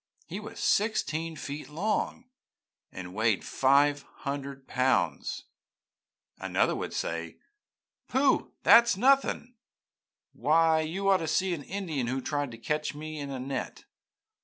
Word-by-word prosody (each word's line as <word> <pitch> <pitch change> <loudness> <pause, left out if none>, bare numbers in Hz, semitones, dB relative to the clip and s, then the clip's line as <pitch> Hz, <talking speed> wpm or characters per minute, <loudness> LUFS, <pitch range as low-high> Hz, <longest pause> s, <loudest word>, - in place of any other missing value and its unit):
He - - -6
was - - -9
sixteen 165 -7 0
feet 145 0 -6
long, 210 +9 -2 0.7
and 90 -1 -8
weighed 110 0 +1
five 140 +2 +3
hundred 140 -1 -7
pounds.' 130 0 0 1.0
Another - - +1
would - - -4
say, - - -4 0.7
'Pooh, 265 +1 +2
that 235 +1 +8
is 235 -5 0
nothing! 260 0 +2 0.8
Why, 160 +1 +3
you 180 +6 -3
ought 195 -1 +6
to 165 -3 -4
see 180 +4 +1
an 160 - -4
Indian 160 -8 -3
who 130 +2 -1
tried 145 +1 -2
to 115 - -10
catch 150 +5 -2
me 155 +1 -6
in 140 -1 -5
a 135 -2 -4
net! 130 0 -5
150 Hz, 135 wpm, -29 LUFS, 140-190 Hz, 1.0 s, that